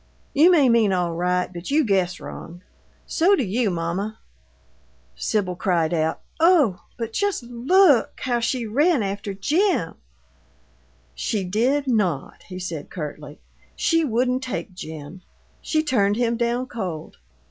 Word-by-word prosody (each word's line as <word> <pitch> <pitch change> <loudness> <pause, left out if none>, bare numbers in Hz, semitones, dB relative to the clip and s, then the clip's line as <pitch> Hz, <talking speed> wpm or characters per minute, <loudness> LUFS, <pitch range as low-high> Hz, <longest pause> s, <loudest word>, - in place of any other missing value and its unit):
You 310 +5 +6
may 310 -7 +5
mean 230 -4 +4
all 175 -2 0
right, 180 +2 -1
but 170 0 -7
you 295 +1 +3
guess 190 -4 +1
wrong. 175 +2 -9 0.4
So 365 +5 +3
do 315 - 0
you, 220 +2 0
mamma." 180 +5 -3 1.0
Sibyl 185 - -1
cried 175 -3 0
out, 160 -1 0 0.2
"Oh! 315 - +4 0.2
But 230 -2 -4
just 405 - -1
LOOK 260 - +3
how 245 -3 0
she 235 +1 -1
ran 280 +4 +2
after 200 0 -4
Jim 305 - +1 0.6
" 65 -1 -36
"She 210 -3 0
did 240 +10 +1
not," 200 - -1
he 185 - -7
said, 170 -5 -5
curtly. 150 -2 -7 0.3
"She 330 -1 +2
wouldn't 250 -1 0
take 250 -5 -5
Jim. 160 0 -9 0.4
She 310 -1 0
turned 205 -9 +2
him 235 0 +1
down 240 +2 0
cold." 180 -10 -6
210 Hz, 140 wpm, -23 LUFS, 175-255 Hz, 1.0 s, You